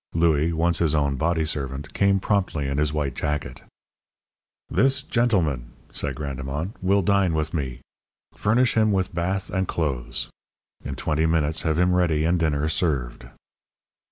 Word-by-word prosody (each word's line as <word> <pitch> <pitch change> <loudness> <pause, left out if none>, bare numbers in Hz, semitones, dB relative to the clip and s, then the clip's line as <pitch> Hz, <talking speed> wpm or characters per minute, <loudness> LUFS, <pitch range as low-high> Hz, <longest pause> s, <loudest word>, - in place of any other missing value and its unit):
Louis, 80 -1 +3
once 85 0 +1
his 80 -2 +2
own 70 -2 +1
body 80 +3 0
servant, 70 -1 -4
came 100 0 +3
promptly, 95 -8 0
in 70 +1 -1
his 75 -1 +2
white 75 -3 -1
jacket. 75 -4 -3 1.1
"This 135 +7 +2
gentleman," 85 - 0 0.2
said - - -2
Grandemont, 70 +4 -4
"will 100 +1 +2
dine 95 -3 +2
with 75 -1 -2
me. 65 -6 -3 0.5
Furnish 115 +4 +2
him 110 -1 +3
with 95 -3 0
bath 90 +3 -2
and 95 -1 0
clothes. 65 -5 -2 0.6
In 70 - -5
twenty 80 +3 0
minutes 80 -1 +1
have 80 -1 0
him 90 +1 +3
ready 80 -4 +2
and 85 +1 +2
dinner 75 -2 +1
served." 70 -7 -1
80 Hz, 150 wpm, -24 LUFS, 70-90 Hz, 1.1 s, Louis